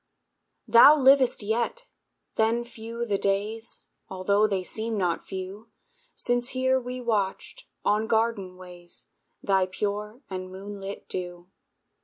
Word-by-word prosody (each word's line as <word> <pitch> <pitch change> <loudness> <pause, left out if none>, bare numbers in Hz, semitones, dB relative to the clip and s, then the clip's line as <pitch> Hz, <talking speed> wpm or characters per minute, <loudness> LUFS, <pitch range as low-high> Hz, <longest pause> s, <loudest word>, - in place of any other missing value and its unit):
Thou 235 +7 +9
livest 265 -4 +5
yet! 235 - -1 0.5
Then 225 +2 +2
few 235 0 -6
the 200 -3 0
days, 210 +4 -2 0.3
Altho' 200 +3 +2
they 195 -3 -1
seem 220 +3 -3
not 175 -4 -1
few, 190 +4 -7 0.5
Since 245 0 0
here 260 0 +3
we 250 0 -6
watched, 225 - -2 0.2
on 215 +2 +2
garden 220 -5 0
ways, 180 -1 -9 0.3
Thy 190 -2 +3
pure 210 +6 -4
and 185 -1 -5
moonlit 195 +1 -7
dew. 175 0 -6
210 Hz, 120 wpm, -27 LUFS, 190-235 Hz, 0.5 s, Thou